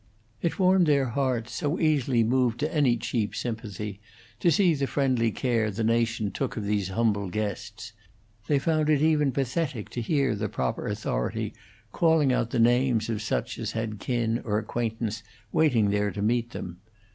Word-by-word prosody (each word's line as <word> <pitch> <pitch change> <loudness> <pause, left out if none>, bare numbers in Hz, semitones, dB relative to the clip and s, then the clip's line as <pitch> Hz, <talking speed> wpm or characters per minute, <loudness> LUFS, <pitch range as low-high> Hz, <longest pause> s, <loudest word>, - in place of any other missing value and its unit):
It 170 - -1
warmed 185 -2 +4
their 140 -4 +3
hearts, 120 -2 -1
so 145 +7 -1
easily 135 -7 +2
moved 120 0 +1
to 155 +2 -1
any 130 -6 +3
cheap 115 -2 -2
sympathy, 105 -3 -5 0.4
to 175 - +3
see 180 -1 +4
the 140 -2 -1
friendly 130 -5 +1
care 115 -1 0
the 110 +2 -3
nation 115 -2 +1
took 130 +5 -3
of 110 - -2
these 100 -2 0
humble 105 -1 0
guests; 110 +3 -4 0.5
they 145 - +3
found 155 +2 +1
it 150 -2 +4
even 150 -3 +3
pathetic 135 -2 -2
to 120 - -4
hear 135 0 +1
the 105 0 -2
proper 65 -7 -2
authority - - -2 0.4
calling 160 -5 +3
out 115 - 0
the - - -2
names 120 -1 +3
of 110 -1 -2
such 85 - -2
as - - -3
had 110 -2 -3
kin 115 0 -1
or 105 -2 0
acquaintance 115 0 -3 0.3
waiting 120 -10 +3
there 105 0 +1
to 100 0 -4
meet 120 +2 +1
them. 90 -6 -7
115 Hz, 170 wpm, -27 LUFS, 110-140 Hz, 0.5 s, warmed